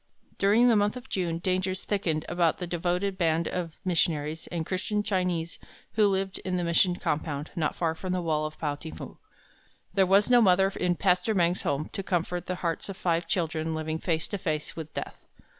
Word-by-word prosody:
During 210 Hz, +5 st, +5 dB
the 235 Hz, -, +5 dB
month 210 Hz, +3 st, +2 dB
of 250 Hz, +1 st, -11 dB
June 175 Hz, -3 st, -1 dB
dangers 185 Hz, +2 st, -1 dB
thickened 170 Hz, -7 st, -1 dB
about 175 Hz, -2 st, +2 dB
the 180 Hz, -, -4 dB
devoted 180 Hz, +3 st, -1 dB
band 165 Hz, -1 st, +2 dB
of 170 Hz, -3 st, -3 dB
missionaries 160 Hz, -3 st, 0 dB
and 165 Hz, -2 st, -3 dB
Christian 205 Hz, +3 st, -1 dB
Chinese 180 Hz, -4 st, -1 dB, 0.3 s
who 215 Hz, -1 st, +4 dB
lived 190 Hz, -1 st, -1 dB
in 185 Hz, -1 st, -2 dB
the 175 Hz, -, -1 dB
mission 175 Hz, +1 st, +3 dB
compound 150 Hz, -2 st, -2 dB
not 155 Hz, -3 st, 0 dB
far 165 Hz, -2 st, 0 dB
from 185 Hz, +3 st, -5 dB
the 180 Hz, 0 st, 0 dB
wall 155 Hz, -2 st, +1 dB
of 155 Hz, -, -11 dB
Pao 150 Hz, -2 st, -1 dB
ting 160 Hz, +2 st, -8 dB
fu. -, -, -9 dB, 0.7 s
There 190 Hz, -1 st, +4 dB
was 200 Hz, +2 st, +5 dB
no 245 Hz, -1 st, +6 dB
mother 190 Hz, -2 st, +5 dB
in 180 Hz, -1 st, +1 dB
Pastor 185 Hz, +3 st, +2 dB
Meng's 175 Hz, -1 st, +2 dB
home 145 Hz, +2 st, -1 dB
to -, -, -2 dB
comfort 180 Hz, -1 st, -2 dB
the 185 Hz, -, -1 dB
hearts 165 Hz, +4 st, -2 dB
of 195 Hz, -, -6 dB
five 170 Hz, -4 st, 0 dB
children 160 Hz, -2 st, -1 dB
living 160 Hz, 0 st, -2 dB
face 160 Hz, -2 st, -1 dB
to 200 Hz, -, -3 dB
face 155 Hz, -4 st, -2 dB
with 160 Hz, -2 st, -7 dB
death. -, -, -6 dB
175 Hz, 200 wpm, -28 LUFS, 160-190 Hz, 0.7 s, no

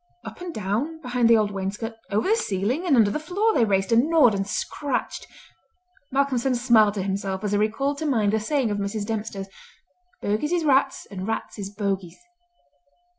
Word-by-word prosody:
Up -, -, -9 dB
and 355 Hz, -1 st, -5 dB
down 235 Hz, -, -2 dB
behind 250 Hz, -4 st, +1 dB
the 230 Hz, -, +7 dB
old 210 Hz, -1 st, +1 dB
wainscot, 200 Hz, +4 st, -4 dB, 0.2 s
over 210 Hz, -, 0 dB
the 440 Hz, -, +5 dB
ceiling 245 Hz, -, -1 dB
and 295 Hz, -, +4 dB
under 215 Hz, -4 st, +4 dB
the 300 Hz, -, -2 dB
floor 395 Hz, +8 st, 0 dB
they 240 Hz, -, +3 dB
raced, 195 Hz, -1 st, 0 dB
and 235 Hz, +7 st, +4 dB
gnawed, 305 Hz, -9 st, +5 dB
and 195 Hz, 0 st, -2 dB
scratched! 285 Hz, +6 st, -3 dB, 0.8 s
Malcolmson 270 Hz, -2 st, +1 dB
smiled 230 Hz, -4 st, +4 dB
to 195 Hz, -, -2 dB
himself 195 Hz, 0 st, -3 dB
as 205 Hz, -, -1 dB
he 205 Hz, -, +2 dB
recalled 270 Hz, +7 st, 0 dB
to 315 Hz, -, -2 dB
mind 215 Hz, -7 st, +2 dB
the 220 Hz, -, +2 dB
saying 250 Hz, 0 st, 0 dB
of 205 Hz, -, -2 dB
Mrs. 205 Hz, +1 st, -3 dB
Dempster, 210 Hz, -2 st, -4 dB, 0.7 s
"Bogies 215 Hz, +11 st, -1 dB
is 340 Hz, -2 st, +1 dB
rats, 270 Hz, -1 st, +2 dB
and 190 Hz, 0 st, -5 dB
rats 225 Hz, -1 st, -4 dB
is 195 Hz, -1 st, -4 dB
bogies!" 195 Hz, -4 st, -3 dB
225 Hz, 185 wpm, -24 LUFS, 200-275 Hz, 0.8 s, the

